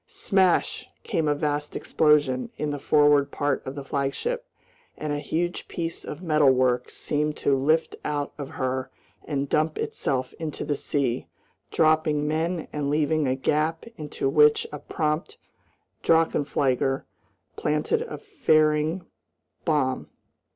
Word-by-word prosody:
Smash! 200 Hz, -, +1 dB
came 160 Hz, -2 st, 0 dB
a 145 Hz, -, +2 dB
vast 150 Hz, 0 st, -2 dB
explosion 150 Hz, -, +2 dB
in 150 Hz, -1 st, -2 dB
the 145 Hz, -, -4 dB
forward 145 Hz, -1 st, +4 dB
part 145 Hz, 0 st, -1 dB
of 130 Hz, -, -5 dB
the 140 Hz, -, -5 dB
flagship, 145 Hz, -, -2 dB, 0.5 s
and 150 Hz, -1 st, -3 dB
a 145 Hz, -, -1 dB
huge 170 Hz, +4 st, -2 dB
piece 165 Hz, -1 st, -4 dB
of 150 Hz, +5 st, -7 dB
metalwork 130 Hz, -6 st, +3 dB
seemed 150 Hz, 0 st, -2 dB
to 140 Hz, -, +2 dB
lift 155 Hz, +5 st, +1 dB
out 145 Hz, -1 st, -2 dB
of 140 Hz, -2 st, -6 dB
her 130 Hz, 0 st, -2 dB, 0.4 s
and 140 Hz, -2 st, -2 dB
dump 155 Hz, +2 st, +1 dB
itself 130 Hz, -2 st, -2 dB
into 160 Hz, -2 st, -4 dB
the 145 Hz, -, 0 dB
sea, 130 Hz, -4 st, -1 dB, 0.4 s
dropping 155 Hz, -2 st, +2 dB
men 160 Hz, +2 st, -1 dB
and 145 Hz, -1 st, -1 dB
leaving 150 Hz, 0 st, +1 dB
a 130 Hz, -, +1 dB
gap 155 Hz, +4 st, 0 dB
into 150 Hz, -6 st, -3 dB
which 150 Hz, +2 st, +5 dB
a 150 Hz, -, -6 dB
prompt 155 Hz, +1 st, -2 dB, 0.6 s
drachenflieger 140 Hz, -5 st, +2 dB, 0.5 s
planted 150 Hz, -, 0 dB
a 475 Hz, -, -5 dB
flaring 160 Hz, -, +1 dB, 0.6 s
bomb. 145 Hz, -6 st, 0 dB
150 Hz, 130 wpm, -25 LUFS, 140-160 Hz, 0.6 s, which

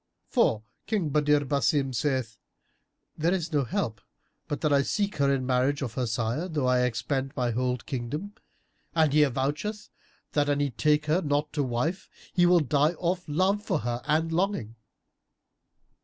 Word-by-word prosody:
For 110 Hz, -, +2 dB, 0.2 s
King 200 Hz, -8 st, 0 dB
Badr 150 Hz, 0 st, +3 dB
Basim 135 Hz, 0 st, +1 dB
saith, 125 Hz, -3 st, -1 dB, 0.8 s
'There 170 Hz, +4 st, +2 dB
is 170 Hz, -3 st, -4 dB
no 145 Hz, -2 st, +3 dB
help 110 Hz, -2 st, -2 dB, 0.5 s
but 145 Hz, -, -3 dB
that 150 Hz, -2 st, +2 dB
I 140 Hz, -, +5 dB
seek 200 Hz, +7 st, -1 dB
her 140 Hz, -1 st, +3 dB
in 135 Hz, -2 st, 0 dB
marriage 130 Hz, +3 st, +1 dB
of 120 Hz, -4 st, -4 dB
her 125 Hz, -1 st, -1 dB
sire, 115 Hz, +9 st, -1 dB
though 150 Hz, -6 st, -1 dB
I 125 Hz, 0 st, +3 dB
expend 130 Hz, +3 st, -2 dB
my 125 Hz, -2 st, 0 dB
whole 125 Hz, +2 st, 0 dB
kingdom'; 145 Hz, -, -5 dB, 0.6 s
and 160 Hz, -3 st, +3 dB
he 150 Hz, -, +5 dB
avoucheth 150 Hz, -, -1 dB, 0.4 s
that, 145 Hz, -1 st, +1 dB
an 145 Hz, 0 st, +1 dB
he 145 Hz, -2 st, 0 dB
take 150 Hz, +5 st, +2 dB
her 155 Hz, +5 st, +2 dB
not 145 Hz, -1 st, -1 dB
to 150 Hz, -, 0 dB
wife, 135 Hz, +8 st, -2 dB, 0.2 s
he 175 Hz, -1 st, +4 dB
will 175 Hz, -1 st, +5 dB
die 150 Hz, +3 st, +2 dB
of 175 Hz, -1 st, -1 dB
love 190 Hz, +7 st, +2 dB
for -, -, -1 dB
her 120 Hz, +1 st, -2 dB
and 155 Hz, +2 st, +1 dB
longing." 170 Hz, -, -1 dB
145 Hz, 170 wpm, -27 LUFS, 125-160 Hz, 0.8 s, I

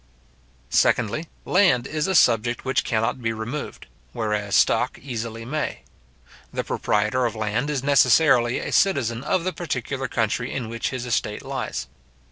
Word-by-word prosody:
Secondly, 120 Hz, -, +2 dB, 0.2 s
land 175 Hz, -11 st, +3 dB
is 155 Hz, +2 st, -2 dB
a 190 Hz, -, 0 dB
subject 120 Hz, -3 st, +3 dB
which 130 Hz, -, +1 dB
cannot 115 Hz, +2 st, -1 dB
be 115 Hz, -1 st, 0 dB
removed; 115 Hz, +7 st, -6 dB, 0.3 s
whereas 105 Hz, -2 st, -1 dB
stock -, -, +3 dB
easily 115 Hz, -3 st, -6 dB
may. 150 Hz, +4 st, -3 dB, 0.7 s
The -, -, -2 dB
proprietor 125 Hz, +4 st, 0 dB
of 115 Hz, -, -5 dB
land 110 Hz, +6 st, -1 dB
is 140 Hz, -3 st, -2 dB
necessarily 130 Hz, -2 st, +4 dB
a -, -, -4 dB
citizen 130 Hz, -, +2 dB
of 185 Hz, +2 st, 0 dB
the 185 Hz, +1 st, -2 dB
particular 135 Hz, -4 st, -3 dB
country 115 Hz, +1 st, -1 dB
in 120 Hz, -5 st, -4 dB
which 115 Hz, 0 st, -2 dB
his 130 Hz, -1 st, -4 dB
estate 110 Hz, -3 st, -2 dB
lies. -, -, -4 dB
120 Hz, 145 wpm, -23 LUFS, 115-140 Hz, 0.7 s, necessarily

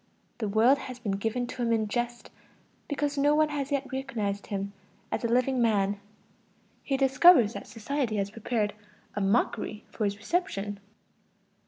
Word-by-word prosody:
The 215 Hz, -3 st, -1 dB
world 235 Hz, +7 st, +4 dB
has 255 Hz, -2 st, -7 dB
been 230 Hz, -5 st, -3 dB
given 225 Hz, +5 st, -1 dB
to 245 Hz, +1 st, -6 dB
him 235 Hz, -1 st, +1 dB
in 220 Hz, -2 st, +2 dB
jest, 240 Hz, +2 st, -3 dB, 0.6 s
because 290 Hz, 0 st, -1 dB
no 290 Hz, +1 st, +4 dB
one 310 Hz, 0 st, +3 dB
has 290 Hz, -1 st, -3 dB
yet 280 Hz, -1 st, 0 dB
recognized 220 Hz, -7 st, -3 dB
him 200 Hz, 0 st, -3 dB, 0.4 s
as -, -, -2 dB
a -, -, +2 dB
living 250 Hz, +2 st, +2 dB
man. 205 Hz, -3 st, +2 dB, 0.8 s
He 275 Hz, -, -1 dB
discovers 270 Hz, -3 st, +6 dB
that -, -, -7 dB
society 245 Hz, 0 st, -2 dB
has 200 Hz, -1 st, -1 dB
prepared 215 Hz, -1 st, -1 dB, 0.4 s
a 205 Hz, -, -2 dB
mockery 210 Hz, +1 st, 0 dB
for 215 Hz, -, -2 dB
his 200 Hz, 0 st, -1 dB
reception. 205 Hz, -, -2 dB
235 Hz, 160 wpm, -28 LUFS, 205-270 Hz, 0.8 s, discovers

